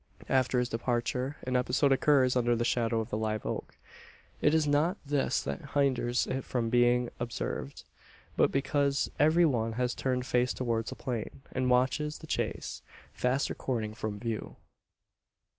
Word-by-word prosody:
After 130 -1 +2
his 125 0 +2
departure, 125 +4 -1
an 130 0 -2
episode 125 +3 +2
occurs 135 -2 +4
under 120 -1 +2
the 120 +1 0
shadow 115 -1 +1
of 110 - -7
the 105 - -1
live 110 -1 -2
oak. - - -4 0.6
It 150 +1 +4
is 160 -1 +3
not 155 +7 +2
this 140 -1 0
that 70 0 -6
hinders 130 -3 +2
it 130 0 -3
from 115 -3 -2
being 120 0 +3
observed; 115 - -4 0.5
but - - +3
because 140 0 +1
every 160 +4 +5
one 115 -6 +1
has 125 +1 0
turned 125 -1 -1
face 125 0 +1
towards 115 -3 -1
the - - -6
plain, 125 +1 -5
and 130 -1 0
watches 130 +5 +1
the - - -11
chase, - - -3 0.3
fast 130 +3 0
receding 110 -5 -3
from 110 -1 -4
view. 115 -1 -4
125 Hz, 160 wpm, -30 LUFS, 120-135 Hz, 0.6 s, every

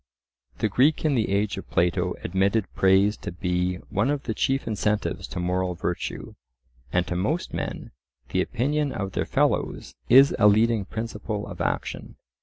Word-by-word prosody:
The - - +1
Greek 135 +10 +2
in 150 - +3
the 115 -5 +1
age 100 0 0
of 95 - -12
Plato 90 +1 +1
admitted 95 +4 +1
praise 95 +2 +4
to - - -6
be 90 0 -1 0.2
one 105 +7 +1
of 145 -1 -1
the 115 - -2
chief 135 +4 0
incentives 105 -1 -1
to 90 - -6
moral 90 0 -1
virtue, 85 +1 -4 0.6
and 90 0 +1
to 90 - -3
most 130 - -1
men - - -4 0.4
the 95 - +1
opinion 140 +8 0
of 100 -3 -3
their - - -1
fellows - - 0 0.2
is 135 +3 +7
a 105 - +7
leading 110 0 +3
principle 110 -1 -4
of - - -8
action. - - -3
105 Hz, 165 wpm, -25 LUFS, 90-115 Hz, 0.6 s, is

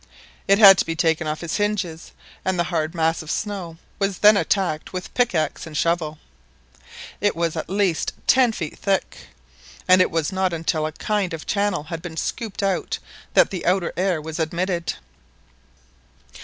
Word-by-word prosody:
It 195 - +5
had 195 -3 +9
to - - +2
be 165 - -2
taken 160 -1 +1
off 155 +2 -3
its 170 - -2
hinges, 200 -6 -2 0.3
and 190 -1 0
the 175 - +2
hard 160 +1 -1
mass 165 0 +1
of 155 - -10
snow 185 -6 -4 0.2
was 195 -2 0
then 210 +1 +7
attacked 190 -6 0
with 180 -1 -6
pickaxe 180 -11 0
and 155 -1 -6
shovel; 165 -2 0 1.0
it 205 0 +2
was 165 -1 -1
at 160 0 -4
least 190 -4 0
ten 255 -2 +5
feet 160 -8 -6
thick, 195 -1 -2 0.6
and 185 0 +6
it - - +3
was 165 +1 -1
not 190 -1 0
until 160 -1 -1
a - - -5
kind 195 +1 -1
of 160 - -10
channel 200 -6 0
bad 165 -1 -4
been 165 -2 -8
scooped 215 +1 -3
out 195 -1 -1 0.4
that - - +5
the 185 - -4
outer 180 -1 +1
air 185 -2 0
was 160 +2 -6
admitted. 170 +1 -1
175 Hz, 170 wpm, -22 LUFS, 160-195 Hz, 1.0 s, had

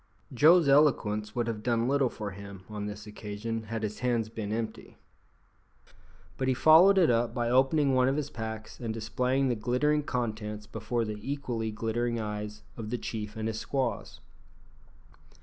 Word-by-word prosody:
Joe's 160 +5 +6
eloquence 115 -7 +3
would 120 -1 0
have 115 -2 -3
done 115 0 +1
little 135 -1 +2
for 105 -3 -6
him 100 0 -10
on 105 -1 -4
this 105 0 -7
occasion 110 +1 -5
had 110 +1 -4
his 105 0 -3
hands 120 -3 0
been 110 -2 -5
empty, 110 0 -5 1.4
but 130 - -1
he 130 - +2
followed 165 +8 +7
it 175 -8 +5
up 115 0 +1
by 120 -1 0
opening 135 +2 +3
one 130 0 +4
of 135 +2 +1
his 145 -1 -3
packs 110 -1 -6
and 115 -2 -3
displaying 125 +4 0
the 125 - +2
glittering 125 +7 +1
contents 110 -5 -3
before 110 +2 -2
the 105 -1 -5
equally 125 -4 -3
glittering 115 +2 -2
eyes 105 -1 -5
of 110 -2 -5
the 125 - -1
chief 105 -2 -5
and 110 0 -3
his 110 -1 -3
squaws. 135 +1 -3
115 Hz, 165 wpm, -29 LUFS, 105-130 Hz, 1.4 s, followed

